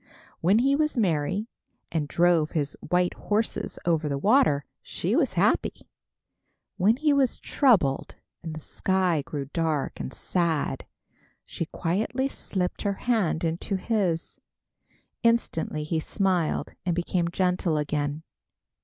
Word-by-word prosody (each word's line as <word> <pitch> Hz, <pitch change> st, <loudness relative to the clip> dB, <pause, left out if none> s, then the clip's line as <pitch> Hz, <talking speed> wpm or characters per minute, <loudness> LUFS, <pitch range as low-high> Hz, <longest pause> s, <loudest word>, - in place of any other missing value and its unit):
When 190 Hz, +6 st, +4 dB
he 270 Hz, +4 st, +3 dB
was 305 Hz, -2 st, 0 dB
merry, 185 Hz, +1 st, +1 dB, 0.4 s
and 155 Hz, -3 st, -1 dB
drove 170 Hz, 0 st, +2 dB
his 145 Hz, -2 st, -1 dB
white 180 Hz, +1 st, +2 dB
horses 215 Hz, +2 st, -2 dB
over 160 Hz, -3 st, +1 dB
the 140 Hz, -, -1 dB
water, 200 Hz, -, +3 dB, 0.2 s
she -, -, -2 dB
was -, -, +2 dB
happy. -, -, 0 dB, 0.9 s
When 215 Hz, +6 st, +4 dB
he 300 Hz, +1 st, +3 dB
was 270 Hz, -3 st, +2 dB
troubled, 195 Hz, -, +2 dB, 0.3 s
and 160 Hz, -2 st, -6 dB
the -, -, -5 dB
sky 185 Hz, -2 st, 0 dB
grew 140 Hz, 0 st, -5 dB
dark 160 Hz, -4 st, -1 dB
and -, -, -4 dB
sad, 170 Hz, -3 st, -1 dB, 0.6 s
she 165 Hz, -, -4 dB
quietly 215 Hz, +12 st, -1 dB
slipped 185 Hz, -8 st, -3 dB
her 200 Hz, -, 0 dB
hand 215 Hz, -10 st, +1 dB
into 165 Hz, +4 st, -1 dB
his. 190 Hz, -5 st, -1 dB, 0.8 s
Instantly 230 Hz, -10 st, +1 dB
he 160 Hz, +1 st, -1 dB
smiled, 180 Hz, -1 st, 0 dB
and 175 Hz, -2 st, 0 dB
became 175 Hz, 0 st, 0 dB
gentle 180 Hz, -2 st, +1 dB
again. 150 Hz, +1 st, -2 dB
175 Hz, 125 wpm, -26 LUFS, 155-210 Hz, 0.9 s, When